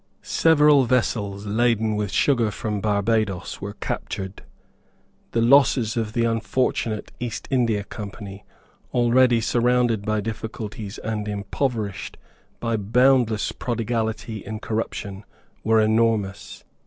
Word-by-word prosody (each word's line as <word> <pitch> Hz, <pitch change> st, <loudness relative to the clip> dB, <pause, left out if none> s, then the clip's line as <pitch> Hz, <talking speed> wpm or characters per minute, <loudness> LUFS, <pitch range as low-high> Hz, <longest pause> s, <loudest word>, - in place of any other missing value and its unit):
Several 150 Hz, -4 st, +4 dB
vessels 105 Hz, -5 st, 0 dB
laden 110 Hz, 0 st, +1 dB
with 105 Hz, -2 st, -2 dB
sugar 120 Hz, -1 st, +2 dB
from 105 Hz, 0 st, -3 dB
Barbadoes 105 Hz, -2 st, 0 dB
were 100 Hz, +1 st, -6 dB
captured. 95 Hz, -1 st, -5 dB, 0.9 s
The 115 Hz, -, +1 dB
losses 125 Hz, -3 st, +4 dB
of 110 Hz, -2 st, -2 dB
the 115 Hz, -1 st, +1 dB
unfortunate 115 Hz, 0 st, -1 dB
East 120 Hz, -2 st, -5 dB
India 115 Hz, -6 st, +1 dB
Company, 100 Hz, -1 st, -8 dB, 0.5 s
already 120 Hz, 0 st, +4 dB
surrounded 120 Hz, -2 st, +2 dB
by 110 Hz, 0 st, 0 dB
difficulties 110 Hz, -1 st, -6 dB
and 105 Hz, -1 st, -4 dB
impoverished 105 Hz, 0 st, -3 dB, 0.4 s
by 115 Hz, -1 st, -1 dB
boundless 120 Hz, +1 st, +3 dB
prodigality 115 Hz, -2 st, -3 dB
in 110 Hz, +1 st, -5 dB
corruption, 105 Hz, -2 st, -4 dB, 0.4 s
were 110 Hz, 0 st, +4 dB
enormous. 110 Hz, -3 st, 0 dB
110 Hz, 105 wpm, -23 LUFS, 105-120 Hz, 0.9 s, Several